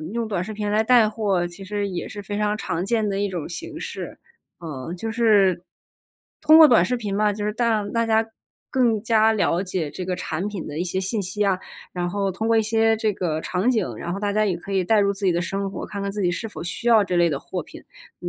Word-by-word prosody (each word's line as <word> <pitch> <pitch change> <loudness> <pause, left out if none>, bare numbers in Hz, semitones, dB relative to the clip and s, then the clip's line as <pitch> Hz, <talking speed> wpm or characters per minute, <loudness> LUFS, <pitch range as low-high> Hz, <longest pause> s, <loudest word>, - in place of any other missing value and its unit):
用 235 -1 -2
短 195 -5 -2
视 215 - -6
频 210 -1 -3
来 215 +1 +3
带 230 -2 +5
货 200 -5 0
其 175 +3 -10
实 205 +1 -2
也 180 -3 -4
是 205 -2 -7
非 205 +1 -5
常 210 0 0
常 175 -3 -2
见 220 0 0
的 195 0 -1
一 205 - 0
种 175 -5 -5
形 325 - -6
式。 - - -7 0.4
呃， 155 -2 -6
就 225 +5 -4
是， 205 -6 +3 0.8
通 310 0 +7
过 315 - +10
短 230 -10 +5
视 250 +6 0
频 210 -4 -4
嘛， 210 0 +2
就 205 0 -4
是 210 - -1
让 220 -3 0
大 230 -1 +1
家 220 0 +3 0.5
更 235 -5 +2
加 220 0 +4
了 185 -4 +1
解 180 -6 -3
这 180 +5 -6
个 185 - -2
产 175 +2 -3
品 200 -7 -5
的 150 +2 -5
一 175 - -1
些 185 +1 -2
信 200 +3 -1
息 200 +3 -2
啊， 190 -2 +2 0.3
然 175 -1 -2
后 195 +1 -1
通 220 +4 -3
过 230 0 +3
一 220 - +4
些 225 +1 +2
这 215 -1 0
个 160 -4 -2
场 185 +9 -1
景， 125 - -1
然 170 +7 -4
后 195 - -5
大 205 -1 -1
家 215 0 +2
也 180 -3 0
可 185 +3 -10
以 190 -2 +1
代 220 +2 +3
入 200 0 +2
自 195 0 -3
己 180 - +4
的 175 +1 0
生 195 +2 -2
活， - - -6
看 200 - -6
看 200 0 -3
自 205 -1 -3
己 175 - +2
是 200 +6 -4
否 - - -8
需 175 +7 -4
要 225 -3 +6
这 185 -3 -1
类 170 -1 +4
的 140 -3 -2
货 - - -5
品。 - - -12 0.4
那 - - -4
205 Hz, 280 characters per minute, -23 LUFS, 180-220 Hz, 0.8 s, 过